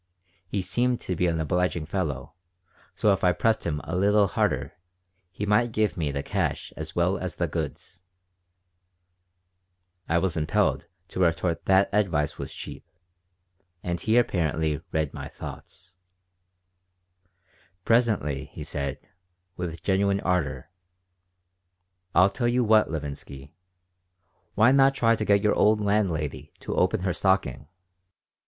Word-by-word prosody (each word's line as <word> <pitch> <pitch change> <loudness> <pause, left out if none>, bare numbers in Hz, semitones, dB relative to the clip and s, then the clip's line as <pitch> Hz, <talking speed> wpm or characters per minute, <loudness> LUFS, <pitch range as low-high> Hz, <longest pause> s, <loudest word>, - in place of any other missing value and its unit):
He 95 +1 -2
seemed 120 +6 0
to 90 - -3
be 90 +2 +1
an 80 -1 0
obliging 85 +1 0
fellow, - - -3 0.6
so 105 - +3
if 95 - -3
I 90 -1 +4
pressed 110 +3 +1
him 75 -3 -1
a 85 - -4
little 100 +2 +4
harder - - -1 0.6
he 100 +3 -5
might 105 +3 +2
give 110 -1 0
me 75 -5 -1
the 70 0 -3
cash - - -2
as - - -7
well - - +1
as - - -4
the - - -1
goods 90 - -5 2.1
I 85 - +3
was 90 0 0
impelled 75 -1 0 0.2
to - - -6
retort 85 -1 +1
that 95 +1 +4
advice 85 -8 0
was - - -5
cheap, - - -9 1.0
and 85 -1 -3
he 110 +2 +2
apparently 80 -9 +1
read 80 -2 -1
my - - -6
thoughts 90 +1 -11 1.9
Presently 100 - +1
he 75 - -7
said, 70 -2 -3 0.6
with 85 -2 -5
genuine 100 +1 +2
ardor: 75 -7 -1 1.4
"I 90 +2 +7
tell 120 +4 -1
you 125 +1 +2
what, 110 -1 +4
Levinsky. 70 -2 -7 1.0
Why 110 +4 +5
not 135 0 +5
try 115 -3 +3
to - - -3
get 100 -1 +3
your 105 - +3
old 105 0 +3
landlady 100 -8 -1
to - - -4
open 90 0 +1
her 95 -1 0
stocking? 85 -9 0
90 Hz, 135 wpm, -26 LUFS, 80-105 Hz, 2.1 s, I